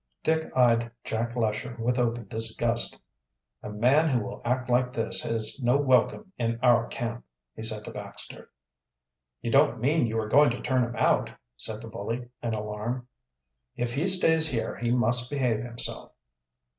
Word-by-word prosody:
Dick 160 0 0
eyed 120 -2 +3
Jack 115 +2 -3
Lesher 115 +1 -2
with 120 +2 0
open 120 -2 -1
disgust. 115 +2 +1 0.6
"A - - -7
man 125 +10 +3
who 125 -7 +1
will - - -8
act 125 +1 -1
like 125 0 +1
that 115 - -2
has 115 +3 -3
no 125 +2 +3
welcome 140 - +1
in 115 -1 -1
our 120 -2 +4
camp," 120 0 -5 0.3
he - - -8
said 110 -1 0
to - - -7
Baxter. - - -10 0.9
"You 115 - -2
don't 140 -3 +4
mean 140 +2 +2
you 110 0 -3
are 110 -1 -1
going 145 +5 +5
to 120 - -4
turn 130 -1 +1
him 120 0 -4
out," 110 - +2 0.3
said 105 - -4
the - - -8
bully, 115 +2 -5
in 115 -2 -2
alarm. 105 +4 -4 0.7
"If 120 0 -3
he 150 +8 0
stays 160 -4 +5
here 115 -5 -2
he 120 0 -2
must 120 0 +2
behave 125 -6 0
himself." 115 0 0
120 Hz, 170 wpm, -27 LUFS, 115-125 Hz, 0.9 s, going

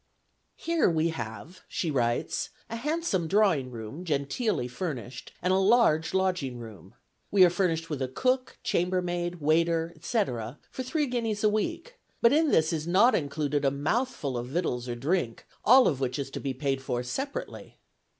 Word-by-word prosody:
"Here 335 - +2
we 165 0 +1
have," 120 - -7
she 165 - -2
writes, 120 -3 0 0.2
"a - - -2
handsome 265 - -1
drawing 185 -9 +3
room, 120 +7 -7
genteelly 145 - -1
furnished, 130 - -6
and 180 +1 +2
a - - +4
large 195 -6 +3
lodging 180 -10 0
room. 110 -7 -11 0.3
We 195 -2 +7
are 175 - +3
furnished 170 -3 0
with 145 -3 -3
a 130 - 0
cook, 255 - 0
chambermaid, 175 -1 0
waiter, 165 +2 +2
etc., 125 - -2
for - - -5
three 295 +4 0
guineas 230 -5 -2
a 215 - +5
week; 340 - -3 0.2
but 235 - +5
in 315 +1 +4
this 160 - +3
is 155 0 -3
not 205 +8 +5
included 145 -1 -1
a 135 - +4
mouthful 145 - -1
of 120 - -5
victuals 125 -5 -2
or 120 - -2
drink, 135 -2 -1 0.2
all 255 +3 +7
of 140 - 0
which 125 -2 -1
is 140 -1 -4
to - - -5
be 135 -2 -3
paid 135 0 -1
for 125 -2 -2
separately." 270 - -5
165 Hz, 170 wpm, -28 LUFS, 135-215 Hz, 0.3 s, We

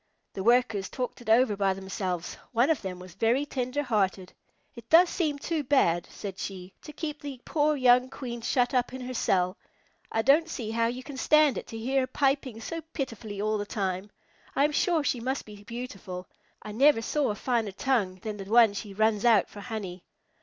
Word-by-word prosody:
The 195 - -4
Workers 225 -4 +3
talked 250 -1 -4
it 240 - -8
over 225 -1 +4
by 195 -1 +1
themselves. 185 -2 -4 0.2
One 245 +6 +4
of 305 - 0
them 185 -2 -5
was 180 -1 -11
very 230 +8 +1
tender 265 +1 -2
hearted. 195 -6 0 0.4
"It 235 -1 -13
does 340 +2 +7
seem 305 -6 0
too 310 +1 -2
bad," 175 -12 +2
said 195 -2 -7
she, 185 -1 -6
"to 300 - -10
keep 300 -1 -5
the 280 -3 -7
poor 300 0 +2
young 250 -1 +4
Queen 240 -3 -6
shut 245 +1 +1
up 250 -1 +1
in 260 - -6
her 255 0 -5
cell. 185 -5 +1 0.5
I 225 - 0
don't 300 +6 +4
see 225 -8 -4
how 230 0 +1
you 250 +2 -4
can 280 -1 -8
stand 305 0 +4
it - - -11
to 225 - -7
hear 260 +5 0
her 255 - -1
piping 270 -3 0
so 330 +8 -5
pitifully 225 -7 -5
all 215 +1 0
the 205 - -3
time. 190 -1 -2 0.5
I 275 - +3
am 300 - +1
sure 325 +1 +2
she 260 -3 0
must 260 +4 -2
be 205 -1 -12
beautiful. 200 -6 -7 0.4
I 215 - -7
never 255 +1 +4
saw 295 +4 0
a 210 - -1
finer 230 -3 -1
tongue 200 -3 0
than 215 -1 -4
the 195 - -7
one 225 0 +5
she 200 -1 -6
runs 215 0 +2
out 225 -5 +4
for 205 - -11
honey." 200 -5 -6
235 Hz, 205 wpm, -28 LUFS, 205-270 Hz, 0.5 s, does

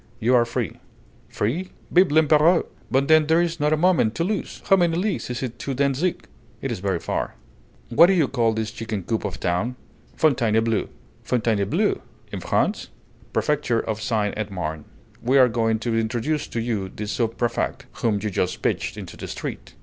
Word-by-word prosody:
"You 120 +3 +2
are 120 -2 +5
free." 115 - -3 0.5
"Free! 160 - -2 0.2
Vive 180 +1 +5
l'Empéreur! 155 +2 +4 0.2
But 135 +1 +2
then 155 0 +5
there's 165 +1 +2
not 150 +1 +2
a 155 - +3
moment 160 -10 +3
to 165 - 0
lose! 205 +3 -3
How 195 - +7
many 170 -3 +2
leagues 195 -4 -1
is 125 +1 -3
it 120 -2 -5
to 135 - -3
Dantzic?" 140 +6 0 0.3
"It's - - -3
very 95 -1 0
far." - - -3 0.5
"What 145 +9 +7
do 195 - +4
you 165 -7 +3
call 120 -4 +1
this 110 0 -2
chicken 110 -4 -4
coop 110 +4 -2
of - - -3
a - - -11
town?" 100 +9 -1 0.4
"Fontainebleau." 115 -6 +2 0.3
"Fontainebleau! 110 -5 +1 0.3
In - - -4
France?" - - 0 0.4
"Prefecture 145 -6 +1
of 110 -1 -4
Seine 105 -2 0
et 110 -1 -3
Marne. 80 -5 -4 0.4
We 130 +4 +3
are 130 -2 +7
going 115 -1 +1
to 115 +1 -2
introduce 120 +7 -1
to 115 - -4
you 110 -5 -2
the 105 - -6
sub 115 +2 -1
préfect, 120 -2 -1 0.2
whom 115 -3 +2
you 105 - -1
just 90 -1 -1
pitched - - -1
into - - -8
the - - -6
street." - - -6
120 Hz, 180 wpm, -23 LUFS, 110-155 Hz, 0.5 s, How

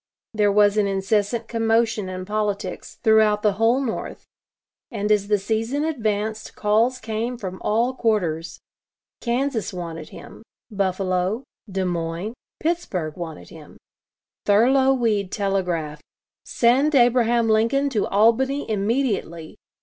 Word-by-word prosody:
There 210 -2 +2
was 205 0 +4
an 205 -1 +3
incessant 205 +3 0
commotion 225 -3 +1
in 185 0 -6
politics 205 -2 -3
throughout 220 -2 +4
the 210 - +4
whole 235 +3 +4
North, 240 -5 -5 0.6
and 210 +1 -2
as 205 -1 +2
the 210 0 +3
season 225 +8 -1
advanced 220 -7 -2
calls 225 +4 +2
came 230 +2 -3
from 185 -4 -7
all 235 +4 +1
quarters. 175 -10 -1 0.6
Kansas 245 -1 -1
wanted 165 -4 -7
him; - - -12 0.3
Buffalo, 190 +2 -1 0.3
Des 190 0 -1
Moines, 170 +4 -3 0.3
Pittsburgh 205 - -2
wanted 160 - -8
him; - - -14 0.7
Thurlow 260 +6 +4
Weed 215 -7 0
telegraphed: 180 -7 -2 0.4
"Send 270 +6 +2
Abraham 240 -2 +4
Lincoln 230 +6 +2
to 215 -5 0
Albany 245 +7 +2
immediately." 205 - -2
215 Hz, 120 wpm, -23 LUFS, 195-235 Hz, 0.7 s, was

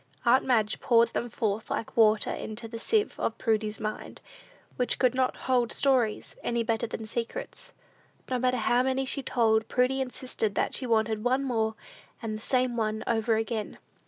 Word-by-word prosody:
Aunt 245 +2 +5
Madge 225 -5 +1
poured 235 -1 +4
them 240 - -3
forth 215 -1 -2
like 225 - -3
water 220 -2 +4
into 220 +1 -6
the 230 0 -7
sieve 430 - 0
of - - -1
Prudy's 215 -2 0
mind, 215 -1 -5 0.6
which 250 - 0
could 255 -2 +3
not 260 0 +1
hold 245 -3 +2
stories 250 -6 +1
any 235 -1 0
better 230 0 -1
than 220 0 -6
secrets. 235 - -5 0.6
No 255 -1 -1
matter 255 0 +1
how 240 +2 +2
many 265 +1 0
she 275 +1 -1
told, 220 -4 +2
Prudy 255 +2 +1
insisted 250 -5 -3
that - - 0
she 255 - -2
wanted 220 -1 +1
"one 260 +3 +2
more," 225 -4 0 0.4
and 220 -1 -4
the 215 - -7
"same 255 0 +1
one 220 -1 -1
over 225 -1 +1
again." 220 -1 -3
235 Hz, 175 wpm, -28 LUFS, 220-255 Hz, 0.6 s, Aunt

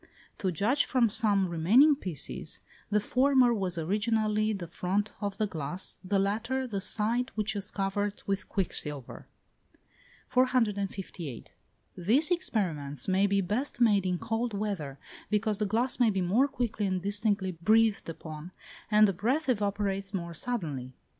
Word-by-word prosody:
To 190 - 0
judge 220 - +2
from 245 -3 +2
some 205 -3 +2
remaining 200 - +5
pieces, 165 - -3 0.3
the 210 0 +3
former 255 +2 +3
was 190 -5 -1
originally 215 +4 +1
the 195 -5 -4
front 190 +5 -2
of 200 -1 -3
the 215 - +1
glass, 170 -1 -3
the 195 +2 0
latter 225 +7 0
the 205 -6 -3
side 230 +5 +1
which 215 -1 -1
was 205 -1 -5
covered 200 +1 -2
with 195 0 -2
quicksilver. 150 - -3 1.0
458. 200 - -1 0.4
These 245 - +3
experiments 170 - -1
may 190 +1 +3
be 200 0 +2
best 225 +9 -2
made 205 -5 +4
in 180 -1 0
cold 225 +2 -2
weather, 190 -10 -3 0.3
because 210 0 0
the 210 - +1
glass 240 +5 0
may 240 -3 +5
be 195 -3 0
more 210 +10 +3
quickly 235 -6 -2
and 185 -1 0
distinctly 200 -1 0
breathed 215 +4 +2
upon, 160 +1 -8 0.4
and 215 0 +6
the 195 - 0
breath 255 - 0
evaporates 200 -3 -1
more 170 -2 -4
suddenly. 155 - -3
205 Hz, 145 wpm, -29 LUFS, 185-225 Hz, 1.0 s, and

